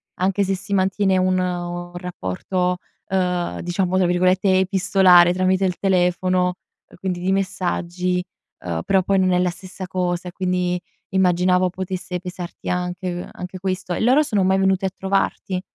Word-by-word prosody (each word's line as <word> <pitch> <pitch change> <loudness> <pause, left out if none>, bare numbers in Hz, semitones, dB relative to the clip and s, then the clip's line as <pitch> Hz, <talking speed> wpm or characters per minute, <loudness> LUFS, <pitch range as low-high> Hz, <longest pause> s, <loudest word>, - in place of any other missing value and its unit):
anche 195 +2 +1
se 195 0 0
si 200 +2 -6
mantiene 190 0 +2
un 185 0 +2
un 175 -1 -3
rapporto, 180 - -2 0.3
uhm, 180 -2 -1
diciamo 180 +1 0
tra 185 - +3
virgolette 185 +2 +3
"epistolare" 185 -2 +5
tramite 185 +1 +2
il 180 -2 -1
telefono, 180 -1 +1 0.4
quindi 180 -1 -3
di 185 +2 0
messaggi, 180 -2 -1 0.4
uhm, 85 -2 -2
però 190 -1 +2
poi 195 +1 +2
non 185 -1 +3
è 180 - +3
la 180 0 +1
stessa 185 +1 -9
cosa, 180 -1 -2
e - - -11
quindi 180 -1 -1 0.3
immaginavo 180 0 +3
potesse 185 0 -4
pesarti 180 -1 -7
anche 180 0 -2
uhm, 175 0 -6
anche 180 +1 -7
questo. 185 -1 -3
E - - -2
loro 260 +6 +4
sono 205 -8 0
mai 190 +1 +3
venuti 190 0 +2
a - - +1
trovarti? 190 -1 -1
185 Hz, 160 wpm, -21 LUFS, 180-190 Hz, 0.4 s, epistolare